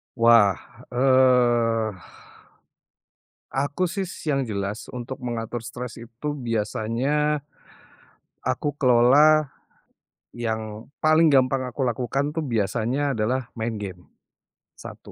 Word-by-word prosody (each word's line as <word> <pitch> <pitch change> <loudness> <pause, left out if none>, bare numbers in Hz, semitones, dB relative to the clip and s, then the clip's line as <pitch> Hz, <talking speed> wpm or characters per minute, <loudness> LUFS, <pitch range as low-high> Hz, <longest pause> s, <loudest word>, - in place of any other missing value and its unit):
Wah! 115 -5 +5 0.4
Eee, 120 -4 +3 1.6
aku 145 +6 0
sih 190 +1 -3 0.2
yang 140 -3 +1
jelas 100 +1 -4
untuk 125 +1 -7
mengatur 120 -1 -4
stres 120 0 -7
itu 120 +6 -5
biasanya, 130 +5 -1 1.0
aku 145 -1 -2
kelola, 140 +4 +5 0.8
yang, 110 -2 -4 0.2
paling 155 +1 +5
gampang 130 -2 +3
aku 125 +2 -4
lakukan 130 +3 -1
tuh 160 0 -3
biasanya 120 +4 -1
adalah 120 +3 -1
main 115 +1 -2
game. 90 -3 -8 0.7
1. - - -11
125 Hz, 95 wpm, -24 LUFS, 115-140 Hz, 1.6 s, Wah